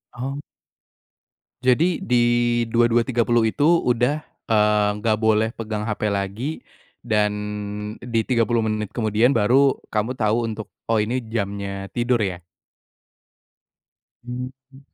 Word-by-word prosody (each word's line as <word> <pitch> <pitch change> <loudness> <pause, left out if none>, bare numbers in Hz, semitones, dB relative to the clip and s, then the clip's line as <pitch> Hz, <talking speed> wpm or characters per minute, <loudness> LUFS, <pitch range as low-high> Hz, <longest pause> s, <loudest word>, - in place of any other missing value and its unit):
Oh. 135 +3 -4 1.3
Jadi 160 +8 +3
di 125 - +2 0.5
22.30 120 0 +2
itu 145 +6 0
udah, 145 -3 +2 0.2
eee, 105 -1 +3
nggak 110 -1 +2
boleh 110 0 +2
pegang 110 -2 -3
HP 105 - -3
lagi, 100 +10 -3 0.4
dan 105 -3 +1 0.7
di 115 -2 -1
30 115 -1 +1
menit 110 -2 -2
kemudian 115 +3 +2
baru 130 +5 +4 0.2
kamu 110 +3 -1
tau 115 -1 +1
untuk, 110 -1 -5 0.2
oh, 115 -1 +2
ini 115 +4 -1 0.2
jamnya 100 -2 -3
tidur 120 0 +2
ya? 95 -4 -1 1.9
Hmm. 130 +2 -8
115 Hz, 110 wpm, -22 LUFS, 105-125 Hz, 1.9 s, baru